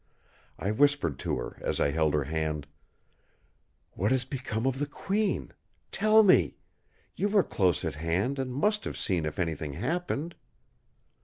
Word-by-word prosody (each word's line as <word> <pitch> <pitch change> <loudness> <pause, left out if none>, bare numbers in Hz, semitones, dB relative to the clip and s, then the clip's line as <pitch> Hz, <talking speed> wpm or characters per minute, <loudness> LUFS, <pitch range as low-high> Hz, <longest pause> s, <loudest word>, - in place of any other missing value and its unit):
I 100 - -1
whispered 140 - +2
to - - -1
her - - -6
as - - -1
I 70 - +2
held 80 -1 +1
her 75 - +1
hand: 75 0 -2 1.3
"What 100 +3 0
has 130 -1 +2
become 125 -4 -3
of 135 0 0
the 145 - -1
Queen? 200 +7 -1 0.4
Tell 215 0 +5
me! 190 -3 +4 0.6
You 205 - 0
were 205 -2 +4
close 90 -4 +1
at 80 - -2
hand, 85 - -1
and 130 -1 -2
must 210 - +1
have - - -4
seen 85 -6 0
if 75 - -5
anything 80 -4 -2
happened!" 165 - -2
120 Hz, 155 wpm, -29 LUFS, -, 1.3 s, Tell